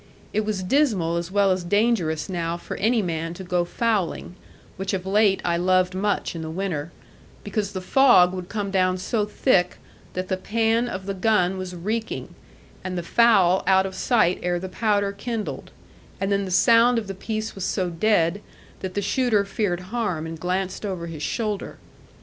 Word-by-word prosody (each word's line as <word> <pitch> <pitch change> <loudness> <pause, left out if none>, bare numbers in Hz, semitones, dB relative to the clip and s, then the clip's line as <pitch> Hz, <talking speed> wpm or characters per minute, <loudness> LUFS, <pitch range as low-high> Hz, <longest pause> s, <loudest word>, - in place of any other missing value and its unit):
It 215 0 0
was 205 -3 -2
dismal 190 - +2
as 170 0 -3
well 200 0 +3
as 185 -1 0
dangerous 180 -5 +1
now 170 -2 -2
for - - -7
any 220 +2 +2
man 165 -1 -3
to 190 - -8
go 180 -1 0
fowling 200 -2 -1 0.4
(which 195 +1 -2
of 185 -1 -5
late 200 0 +3
I 170 -1 +1
loved 185 +1 +2
much 200 -1 -1
in 165 - -5
the 160 - -5
winter) 170 -3 -3 0.5
because 205 0 -3
the 185 - -4
fog 185 -4 +5
would 185 -1 -6
come 205 -2 -3
down 185 -1 +2
so 205 +3 -1
thick 195 -4 +1 0.4
that 185 0 -3
the 185 - -1
pan 225 +4 +1
of 190 -3 -5
the 195 - -2
gun 190 -2 +2
was 185 -1 -6
reeking, 220 +6 -4 0.5
and 185 -1 -4
the 175 - -3
fowl 190 -3 +4
out 190 0 +4
of 190 - -5
sight 185 -4 +2
ere 175 0 0
the 185 +2 -5
powder 205 0 +1
kindled, 215 +2 -5 0.5
and 195 +1 -1
then 200 0 +1
the - - -5
sound 230 +6 +5
of 225 - -1
the 195 - -5
piece 215 +3 -4
was 195 - -6
so 185 -2 -1
dead, 175 +1 +1 0.4
that 185 -1 -6
the 205 - -1
shooter 220 -2 +2
feared 195 -3 -1
harm, 205 -10 -1
and 165 0 -7
glanced 185 +3 -2
over 185 -5 -3
his 165 -3 -7
shoulder. 210 +4 -3
190 Hz, 185 wpm, -24 LUFS, 180-215 Hz, 0.5 s, fog